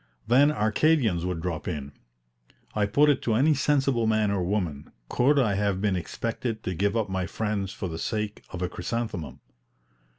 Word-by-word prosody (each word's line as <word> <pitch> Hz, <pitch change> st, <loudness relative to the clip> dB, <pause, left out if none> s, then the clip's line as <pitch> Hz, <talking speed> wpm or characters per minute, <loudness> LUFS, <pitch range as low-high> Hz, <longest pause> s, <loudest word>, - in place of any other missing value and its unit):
Then 140 Hz, +5 st, +5 dB
Arcadians 110 Hz, -, +2 dB
would 90 Hz, -3 st, -3 dB
drop 80 Hz, -3 st, -4 dB
in. 70 Hz, -5 st, -4 dB, 0.8 s
I 105 Hz, -1 st, +1 dB
put 145 Hz, +9 st, +4 dB
it 145 Hz, -, +3 dB
to 115 Hz, -, 0 dB
any 145 Hz, +7 st, +4 dB
sensible 135 Hz, -5 st, +1 dB
man 110 Hz, -2 st, +2 dB
or 100 Hz, -2 st, 0 dB
woman, 90 Hz, -6 st, -2 dB, 0.2 s
could 140 Hz, +4 st, +3 dB
I 115 Hz, -7 st, +3 dB
have 100 Hz, -1 st, 0 dB
been 100 Hz, -1 st, +1 dB
expected 115 Hz, +5 st, -3 dB
to 95 Hz, -, -2 dB
give 100 Hz, +6 st, 0 dB
up 110 Hz, -, 0 dB
my 95 Hz, -1 st, -2 dB
friends 105 Hz, -3 st, -2 dB
for 95 Hz, -, -5 dB
the 80 Hz, -1 st, -5 dB
sake 105 Hz, +1 st, -3 dB
of 90 Hz, 0 st, -5 dB
a -, -, +1 dB
chrysanthemum? 90 Hz, -3 st, -4 dB
105 Hz, 175 wpm, -26 LUFS, 90-120 Hz, 0.8 s, Then